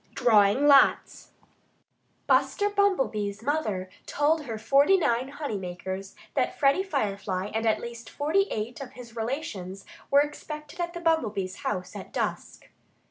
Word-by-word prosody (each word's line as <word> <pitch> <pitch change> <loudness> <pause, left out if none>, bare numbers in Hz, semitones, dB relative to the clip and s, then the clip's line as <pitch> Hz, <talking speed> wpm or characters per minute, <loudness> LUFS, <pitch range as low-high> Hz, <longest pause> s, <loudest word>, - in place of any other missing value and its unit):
X - - -7
DRAWING 215 +3 +5
LOTS 280 -1 +4 1.0
Buster 410 0 +2
Bumblebee's 260 - 0
mother 220 -10 -1 0.2
told 300 +1 +1
her 225 -4 -4
forty 275 - +4
nine 255 -7 +1
honey 280 -6 -4
makers 190 +1 -6 0.2
that - - 0
Freddie 280 +5 +3
Firefly 200 - -2
and 225 +1 0
at 220 - +2
least 235 -1 -8
forty 330 +8 +1
eight 225 +4 -4
of 260 -1 -8
his 240 -3 -12
relations 220 - -4 0.2
were 280 +1 +6
expected 300 +2 -6
at 345 0 -2
the 345 - -6
Bumblebees' 220 - 0
house 210 -10 -4
at - - -8
dusk. - - -4
245 Hz, 140 wpm, -27 LUFS, 205-300 Hz, 1.0 s, were